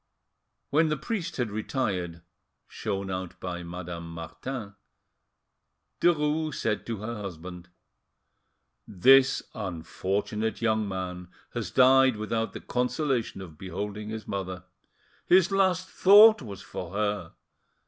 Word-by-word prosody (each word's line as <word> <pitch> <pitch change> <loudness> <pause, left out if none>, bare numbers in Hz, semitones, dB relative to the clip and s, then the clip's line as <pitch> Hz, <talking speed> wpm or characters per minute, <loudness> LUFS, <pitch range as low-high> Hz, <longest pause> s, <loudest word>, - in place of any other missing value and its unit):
When 155 +2 +4
the 150 - 0
priest 180 +3 -4
had 120 -5 -1
retired, 95 -7 -2 0.4
shown 100 -3 -4
out 95 -1 -5
by 90 -1 -5
Madame 85 -1 -7
Martin, 100 - -6 1.3
Derues 155 -2 +2
said 105 -2 -2
to 115 -2 -3
her 115 +2 -4
husband— 90 -1 -8 1.2
"This 135 +7 +5
unfortunate 100 +4 -3
young 110 -2 +1
man 90 -1 -5 0.3
has - - -3
died 130 -1 +5
without 110 +1 -2
the - - -7
consolation 125 -4 -1
of 80 -5 -11
beholding 105 +3 -5
his 110 0 -6
mother.... 95 -2 -4 0.6
His 185 +1 +5
last 185 -2 +2
thought 210 +3 +7
was 100 -5 -8
for 90 0 -7
her.... 100 -4 -2
105 Hz, 115 wpm, -27 LUFS, 90-135 Hz, 1.3 s, thought